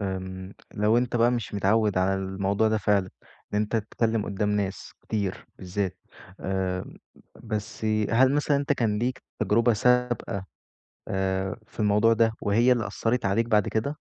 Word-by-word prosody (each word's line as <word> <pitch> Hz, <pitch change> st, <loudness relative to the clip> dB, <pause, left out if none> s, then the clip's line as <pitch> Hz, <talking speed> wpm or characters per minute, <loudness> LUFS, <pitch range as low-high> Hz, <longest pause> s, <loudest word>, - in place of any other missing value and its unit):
امم 95 Hz, 0 st, -5 dB, 0.2 s
لو 105 Hz, +3 st, +3 dB
أنت 120 Hz, 0 st, -1 dB
بقى 120 Hz, +1 st, +4 dB
مش 115 Hz, -4 st, -3 dB
متعود 100 Hz, 0 st, +2 dB
على 95 Hz, +1 st, +2 dB
الموضوع 95 Hz, +2 st, 0 dB
ده 110 Hz, 0 st, +1 dB
فعلًا، 100 Hz, -2 st, +1 dB, 0.4 s
إن -, -, +2 dB
أنت 105 Hz, +2 st, 0 dB
تتكلّم 110 Hz, 0 st, -1 dB
قدّام 105 Hz, +1 st, -1 dB
ناس 100 Hz, -2 st, -2 dB
كتير 100 Hz, -4 st, -3 dB
بالذات. 95 Hz, +1 st, -3 dB, 0.4 s
آآ 95 Hz, -1 st, -2 dB, 0.6 s
بس 110 Hz, 0 st, -4 dB, 0.3 s
هل 130 Hz, +4 st, +5 dB
مثلًا 145 Hz, -1 st, +2 dB
أنت 145 Hz, +1 st, +1 dB
كان 110 Hz, -5 st, 0 dB
ليك 125 Hz, +2 st, -2 dB, 0.2 s
تجربة 115 Hz, +3 st, +3 dB
سابقة 120 Hz, -4 st, +1 dB, 0.6 s
آآ 95 Hz, -1 st, -1 dB
في -, -, -10 dB
الموضوع 105 Hz, +2 st, +4 dB
ده، 115 Hz, 0 st, +3 dB
وهي 115 Hz, +5 st, +4 dB
اللي 115 Hz, -3 st, 0 dB
أثّرِت 115 Hz, -2 st, -1 dB
عليك 115 Hz, +4 st, +1 dB
بعد 105 Hz, -4 st, +2 dB
كده؟ 140 Hz, +7 st, -1 dB
105 Hz, 155 wpm, -26 LUFS, 95-115 Hz, 0.6 s, هل